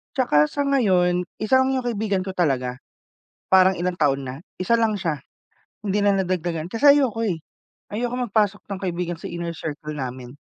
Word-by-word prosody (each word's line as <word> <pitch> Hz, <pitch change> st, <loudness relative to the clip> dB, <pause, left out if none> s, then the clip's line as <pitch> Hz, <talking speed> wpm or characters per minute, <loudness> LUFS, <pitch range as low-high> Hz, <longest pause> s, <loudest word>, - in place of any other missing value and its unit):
'Tsaka 150 Hz, -, +3 dB
sa 285 Hz, -, -1 dB
ngayon, 180 Hz, -10 st, +2 dB
isa 240 Hz, +5 st, +3 dB
lang 265 Hz, 0 st, +2 dB
yung 255 Hz, -1 st, -2 dB
kaibigan 210 Hz, -5 st, -1 dB
ko 190 Hz, -, -4 dB
talaga. 130 Hz, -8 st, 0 dB, 0.7 s
Parang 190 Hz, 0 st, +5 dB
ilang 180 Hz, +1 st, -1 dB
taon 140 Hz, -4 st, +1 dB
na. 130 Hz, 0 st, -5 dB, 0.2 s
Isa 185 Hz, +6 st, +2 dB
lang 225 Hz, -2 st, +1 dB
siya. 165 Hz, -7 st, -2 dB, 0.6 s
Hindi 200 Hz, 0 st, 0 dB
na 205 Hz, 0 st, +4 dB
nadagdagan 175 Hz, -3 st, -2 dB
kasi 280 Hz, +8 st, +5 dB
ayoko, 230 Hz, -5 st, 0 dB
eh. 185 Hz, -7 st, -1 dB, 0.5 s
Ayoko 240 Hz, +3 st, -2 dB
magpasok 205 Hz, -1 st, +1 dB
ng 200 Hz, -2 st, -5 dB
kaibigan 175 Hz, -2 st, -2 dB
sa -, -, -6 dB
inner 170 Hz, -1 st, -4 dB
circle 155 Hz, -1 st, -6 dB
namin. 130 Hz, -2 st, -6 dB
185 Hz, 170 wpm, -23 LUFS, 160-220 Hz, 0.7 s, Parang